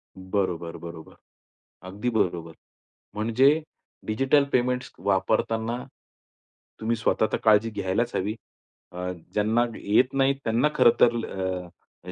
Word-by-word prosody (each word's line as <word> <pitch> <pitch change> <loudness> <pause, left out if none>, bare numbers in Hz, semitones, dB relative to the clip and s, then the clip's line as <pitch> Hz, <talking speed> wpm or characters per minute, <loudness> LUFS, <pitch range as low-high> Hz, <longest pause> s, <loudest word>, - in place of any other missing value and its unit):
बरोबर, 95 -3 -3
बरोबर. 85 -1 -10 0.7
अगदी 105 +6 -2
बरोबर, 85 -7 -1 0.6
म्हणजे 130 +8 +3 0.4
डिजिटल 135 +6 +3
पेमेंट्स 125 0 0
वापरताना, 110 +4 0 1.0
तुम्ही 115 +1 0
स्वतः 110 -1 +1
तर - - +1
काळजी 110 0 +4
घ्यायलाच 105 +3 -1
हवी. 105 +3 -1 0.6
अ, 90 +1 -4 0.2
ज्यांना 110 +3 +2
येत 125 +6 +2
नाही 135 0 +3
त्यांना 115 +6 +2
खरं - - +6
तर 120 0 +6 0.9
अ - - -5
110 Hz, 110 wpm, -25 LUFS, 95-120 Hz, 1.0 s, खरं